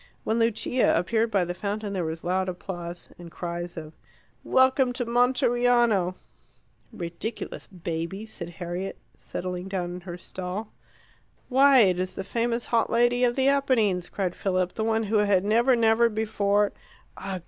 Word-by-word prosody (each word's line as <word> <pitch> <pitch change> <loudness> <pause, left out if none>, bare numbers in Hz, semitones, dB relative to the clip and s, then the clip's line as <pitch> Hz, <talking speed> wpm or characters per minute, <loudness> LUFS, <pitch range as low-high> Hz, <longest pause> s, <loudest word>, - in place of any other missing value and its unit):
When 225 +1 0
Lucia 230 +1 +2
appeared 220 +6 +1
by 195 -4 +1
the 175 - -3
fountain 205 +2 -4
there 185 -3 -1
was 160 0 -4
loud 185 +1 0
applause, 175 -1 -7
and 175 -1 -9
cries 175 0 -5
of 155 -1 -7 0.5
"Welcome 260 -1 +3
to 245 -1 -3
Monteriano!" 240 -5 +2 0.8
"Ridiculous 195 +2 -6
babies!" 180 +4 -5
said 170 -3 -6
Harriet, 175 +2 -5 0.2
settling 180 0 -5
down 180 -2 -3
in 180 - -7
her 175 -1 -7
stall. 185 +4 -6 0.8
"Why, 270 0 +6
it 185 -4 +3
is 185 0 -3
the 195 - -4
famous 235 +3 -1
hot 230 -2 +1
lady 240 +1 +3
of 240 -1 +3
the 265 0 +2
Apennines," 230 -10 +2
cried 185 -3 -2
Philip; 185 -2 -1
"the 220 - -2
one 225 0 +1
who 215 +1 +1
had 200 -2 +2
never, 235 +5 +4
never 230 0 +4
before 210 -2 +1 0.2
" - - -31
"Ugh! 190 -1 -4
200 Hz, 160 wpm, -26 LUFS, 180-235 Hz, 0.8 s, Why